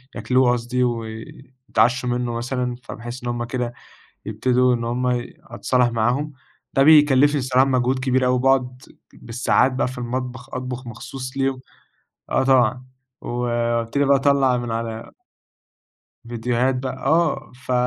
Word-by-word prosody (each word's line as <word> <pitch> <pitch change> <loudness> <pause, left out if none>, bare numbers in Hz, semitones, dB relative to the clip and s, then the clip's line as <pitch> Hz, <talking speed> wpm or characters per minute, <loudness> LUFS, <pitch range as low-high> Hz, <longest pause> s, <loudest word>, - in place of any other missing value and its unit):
ياكلوه 130 -1 +2
قصدي 125 +1 -1
وي 115 +1 -5 0.2
يتعشوا 125 +1 +2
منُّه 120 -1 -1
مثلًا، 125 +1 -2
فباحس 120 +1 -8
إن 120 - -3
هُم 120 0 -2
كده 120 0 -3 0.5
يبتدوا 125 +3 +2
إن 115 -1 -3
هُم 125 +2 -1
ي 120 0 -3
أتصالح 125 -1 0
معاهم، 125 +6 0 0.4
ده 135 - +4
بيكلّفني 145 -1 +5
الصراحة 130 0 +3
مجهود 130 0 +1
كبير 130 0 +1
أوي 125 0 +2
باقعُد 130 -1 +1 0.3
بالساعات 125 +2 +1
بقى 130 - 0
في 130 0 -8
المطبخ 125 +1 -5
أطبخ 130 0 -5
مخصوص 130 +3 -8
ليهم، 135 -1 0 0.7
آه - - +2
طبعًا، 130 -1 +2 0.4
وابتدي 120 +2 -1
بقى 140 0 +5
اطلّع 135 -2 +3
من 120 -1 -4
على 115 0 -4 1.2
فيديوهات 120 +2 0
بقى 130 0 -4
آه 165 -1 +1
ف 130 0 -6
125 Hz, 140 wpm, -22 LUFS, 120-130 Hz, 1.2 s, بيكلّفني